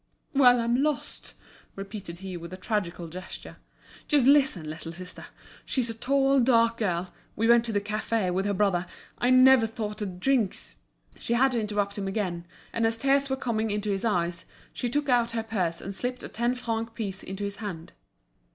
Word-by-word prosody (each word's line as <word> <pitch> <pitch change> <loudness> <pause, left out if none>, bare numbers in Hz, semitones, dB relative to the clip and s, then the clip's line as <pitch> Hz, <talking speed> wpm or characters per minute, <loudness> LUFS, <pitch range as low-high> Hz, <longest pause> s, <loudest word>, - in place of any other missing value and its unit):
"Well, 250 -3 +6
I'm 235 +2 +1
lost," 300 0 -3 0.4
repeated 195 -3 -7
he, 190 -1 -6
with 170 0 -8
a - - -6
tragical 180 -4 -2
gesture. 185 +3 -9 0.5
"Just 290 -5 +3
listen, 270 - +4
little 160 +2 -6
sister; 180 +1 -9 0.4
she's 245 -3 -1
a - - -5
tall, 275 +4 +2
dark 230 -2 +4
girl; 180 -4 -1 0.2
we 225 - +1
went 235 0 +6
to 230 - 0
the 205 - +1
café 210 -2 -1
with 190 +2 0
her 205 - +1
brother. 185 -3 +1 0.3
I 245 - +2
never 255 -2 +7
thought 215 -2 -5
the 210 - -2
drinks—" 195 - -1 0.4
She 235 - -2
had 265 +3 +4
to 235 -2 0
interrupt 205 -1 -1
him 195 - -3
again, 180 -4 -2 0.3
and 230 -1 +2
as 225 0 -1
tears 275 +2 +2
were 265 - +1
coming 225 -4 -1
into 210 0 -1
his 195 -1 -2
eyes, 175 -6 0 0.3
she 245 - -2
took 290 +3 0
out 240 -2 +2
her 225 -1 -1
purse 185 -7 -1
and 195 - -6
slipped 250 +5 -3
a - - -6
ten 240 +2 0
franc 230 -2 -3
piece 200 -4 -4
into 195 +2 -6
his 200 0 -4
hand. 180 -6 -7
215 Hz, 190 wpm, -27 LUFS, 190-245 Hz, 0.5 s, never